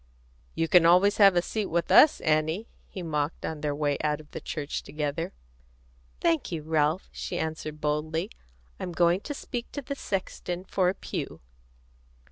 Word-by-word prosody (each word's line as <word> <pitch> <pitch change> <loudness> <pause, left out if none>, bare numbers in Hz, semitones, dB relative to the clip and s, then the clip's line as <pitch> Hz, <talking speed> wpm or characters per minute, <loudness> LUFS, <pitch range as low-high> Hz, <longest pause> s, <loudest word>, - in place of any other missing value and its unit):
"You 165 - +1
can 175 +1 +6
always 185 +4 +5
have 195 -3 +7
a 175 - +3
seat 215 +1 -2
with 170 +1 -1
us, 310 0 +7
Annie," 155 +6 +1 0.2
he 185 - -6
mocked, 150 -1 -2
on 155 -2 -4
their 145 -1 -1
way 145 -1 0
out 150 -1 +1
of 150 -1 -15
the - - -6
church 150 -2 -4
together. 150 +2 -3 0.9
"Thank 165 - +1
you, 160 -3 -3
Ralph," 155 +2 +1
she 175 - -5
answered 155 -1 -4
boldly. 155 +5 -1 0.5
"I'm 180 - -4
going 170 +2 +3
to 290 +8 -6
speak 245 -3 -5
to 285 - -3
the 280 - -4
sexton 185 -6 -4
for 185 -1 +1
a 190 - -2
pew." - - -5
165 Hz, 170 wpm, -27 LUFS, 155-185 Hz, 0.9 s, have